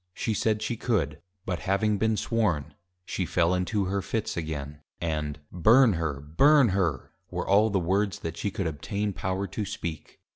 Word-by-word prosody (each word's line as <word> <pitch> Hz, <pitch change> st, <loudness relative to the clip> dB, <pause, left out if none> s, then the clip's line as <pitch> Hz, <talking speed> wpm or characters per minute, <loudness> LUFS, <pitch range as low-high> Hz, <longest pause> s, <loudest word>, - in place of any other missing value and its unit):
She 110 Hz, -, -1 dB
said, 110 Hz, 0 st, 0 dB
she 115 Hz, -, -2 dB
could; 90 Hz, -, -1 dB, 0.2 s
but 90 Hz, -2 st, -2 dB
having 100 Hz, +2 st, +1 dB
been 110 Hz, 0 st, +2 dB
Sworn, 100 Hz, -13 st, 0 dB, 0.3 s
she 95 Hz, -, -2 dB
fell 85 Hz, 0 st, +2 dB
into 95 Hz, +2 st, 0 dB
her 100 Hz, +1 st, -1 dB
Fits 110 Hz, +3 st, -2 dB
again, 75 Hz, -3 st, -5 dB, 0.2 s
and, 75 Hz, -3 st, -2 dB
Burn 110 Hz, +7 st, +5 dB
her! 80 Hz, -5 st, -2 dB
Burn 130 Hz, -, +5 dB
her! 95 Hz, -2 st, -1 dB, 0.2 s
were -, -, -4 dB
all 105 Hz, +3 st, +5 dB
the 100 Hz, -, +1 dB
words 95 Hz, +3 st, 0 dB
that 80 Hz, 0 st, -4 dB
she 100 Hz, -, -2 dB
could 95 Hz, -1 st, -3 dB
obtain 100 Hz, +7 st, -2 dB
power 95 Hz, +2 st, -2 dB
to 105 Hz, -, -4 dB
speak. 85 Hz, -5 st, -6 dB
95 Hz, 175 wpm, -27 LUFS, 80-105 Hz, 0.3 s, Burn